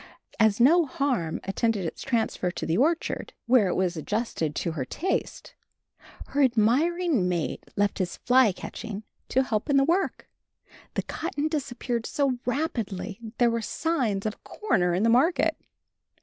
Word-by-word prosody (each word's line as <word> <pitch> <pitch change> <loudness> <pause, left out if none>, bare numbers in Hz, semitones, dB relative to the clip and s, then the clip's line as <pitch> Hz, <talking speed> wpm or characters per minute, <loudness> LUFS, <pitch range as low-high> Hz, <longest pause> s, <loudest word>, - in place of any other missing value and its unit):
As 220 -1 +4
no 320 +6 +5
harm 255 - -1
attended 200 0 0
its 165 - -5
transfer 230 -7 0
to - - -5
the 165 - 0
orchard, 315 - 0
where 235 -5 +4
it 180 - 0
was 185 -1 0
adjusted 165 -3 -2
to 170 - -1
her 155 -5 -3
taste, 360 - -3 0.8
her 285 - +1
admiring 260 - +2
mate 175 -3 -2
left 205 0 +1
his 180 -2 -2
fly 250 -3 +4
catching 210 +3 -7 0.3
to 265 - +3
help 225 +2 -2
in 280 - +4
the 275 - +5
work, 350 +7 0 0.7
the - - 0
cotton 310 -3 -3
disappearing 245 -6 -3
so 270 -4 0
rapidly 230 -8 -2 0.2
there 240 -1 +4
were 230 0 -1
signs 230 -9 -1
of 215 - 0
a - - -21
corner 180 - 0
in 190 - +1
the - - +4
market. 265 +10 +3
235 Hz, 155 wpm, -26 LUFS, 195-280 Hz, 0.8 s, no